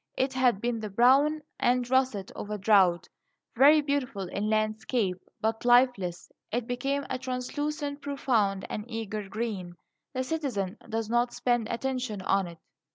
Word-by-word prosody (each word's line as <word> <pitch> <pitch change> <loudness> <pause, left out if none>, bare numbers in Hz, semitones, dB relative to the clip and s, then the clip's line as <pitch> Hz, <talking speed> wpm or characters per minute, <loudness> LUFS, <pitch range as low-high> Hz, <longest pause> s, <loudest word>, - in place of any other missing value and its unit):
It 265 +1 +1
had 250 -6 +2
been 240 -1 -1
the 215 -1 -5
brown 275 +8 +4 0.2
and 245 0 +2
russet 255 -7 +1
of 205 - -7
drought 190 -4 +4 0.5
very 290 +5 +7
beautiful 275 -9 -2
in 205 +3 -2
landscape, 215 -1 0 0.2
but 225 0 -1
lifeless; 240 -8 +3 0.2
it 235 +1 -1
became 275 +4 -2
a 255 - -3
translucent, 285 +3 -3
profound, 225 -9 0
and 210 - -4
eager 215 -3 -4
green. 205 -5 -4 0.4
The 255 - 0
citizen 255 -10 -2
does 225 -1 -2
not 240 +1 +1
spend 240 -3 0
attention 245 -4 -3
on 195 0 +1
it. 170 -1 -10
240 Hz, 145 wpm, -28 LUFS, 210-260 Hz, 0.5 s, very